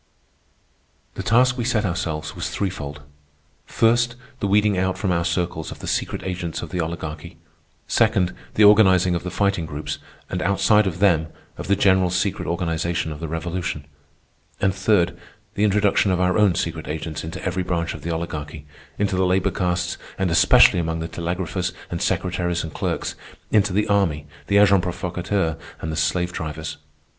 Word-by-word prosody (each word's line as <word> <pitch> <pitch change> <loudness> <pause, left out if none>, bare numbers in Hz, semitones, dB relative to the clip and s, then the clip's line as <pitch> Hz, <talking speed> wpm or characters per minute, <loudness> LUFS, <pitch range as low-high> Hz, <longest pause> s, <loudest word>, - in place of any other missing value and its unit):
The - - -5
task 125 +6 +3
we - - 0
set 115 -3 +1
ourselves 80 -4 -3
was - - -3
threefold. 75 -7 -4 0.6
First, 120 +1 +2 0.2
the 100 - -1
weeding 105 0 +3
out 95 0 0
from 95 - -1
our 85 -1 +1
circles 85 -2 -2
of - - -8
the - - -9
secret - - -2
agents 90 -3 -4
of 85 - -7
the 90 - -2
Oligarchy. 80 0 -6 0.5
Second, 110 -6 +2 0.2
the 105 - +5
organizing 95 -4 +6
of 85 - -1
the 90 - -5
Fighting 100 -4 0
Groups, 75 -1 -5 0.3
and 90 - -3
outside 100 +2 +3
of 90 -3 -3
them, 85 -5 +3 0.3
of - - -7
the 100 - +3
general 95 -2 +3
secret 90 +2 -1
organization 85 -1 -1
of 75 - -7
the 80 - -4
Revolution. 85 -1 -3 0.7
And 95 -1 +2
third, 95 -2 +2 0.4
the 105 - 0
introduction 105 -1 +3
of 90 -1 +1
our 90 0 +2
own 105 -5 +4
secret - - -3
agents 80 +1 -4
into 80 +1 -6
every 95 0 -1
branch 85 -2 -1
of 75 - -9
the 85 - -5
Oligarchy—into 80 +3 -4
the 95 - +2
labor 95 +1 +2
castes 90 -1 -1 0.2
and 95 -2 0
especially 85 +1 +6
among 80 -1 -1
the 80 - -3
telegraphers 90 +2 -3 0.2
and - - -3
secretaries 90 -1 -1
and 80 -2 -7
clerks, - - -2 0.4
into 105 -1 +3
the 105 +3 +1
army, 95 -8 +1 0.2
the 100 - +3
agents 100 -2 +6
provocateurs, 90 -1 -2 0.2
and 80 - -4
the - - -3
slave 90 +3 0
drivers. 80 0 -5
90 Hz, 170 wpm, -22 LUFS, 80-100 Hz, 0.7 s, organizing